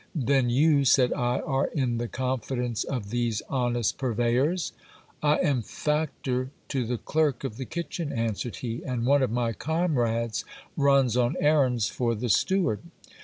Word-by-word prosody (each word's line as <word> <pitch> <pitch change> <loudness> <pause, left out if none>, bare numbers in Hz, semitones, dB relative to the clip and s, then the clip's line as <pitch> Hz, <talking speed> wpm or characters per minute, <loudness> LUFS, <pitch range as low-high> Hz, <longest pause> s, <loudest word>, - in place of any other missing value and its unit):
Then 135 -3 +2
you, 140 +3 +4
said 130 -1 +4
I, 125 +1 0
are 135 0 0
in 125 -6 -1
the 120 - -2
confidence 125 -2 -2
of 110 -7 -4
these 120 -3 -1
honest 120 -4 0
purveyors? 125 - +1 0.5
I 150 0 +4
am 135 -5 +2
factor 135 -1 -2 0.2
to 130 -4 -1
the 125 0 -1
clerk 150 -1 0
of 115 -5 -4
the 130 - -4
kitchen, 170 0 -4
answered 115 0 -2
he; 120 -1 -4
and 125 -3 -2
one 140 +2 +4
of 130 - +2
my 115 0 0
comrades 120 - 0 0.3
runs 140 -4 +3
on 125 +4 +2
errands 135 -7 +3
for 120 -2 -1
the 120 +3 -3
steward. 175 - +2
125 Hz, 155 wpm, -27 LUFS, 120-140 Hz, 0.5 s, you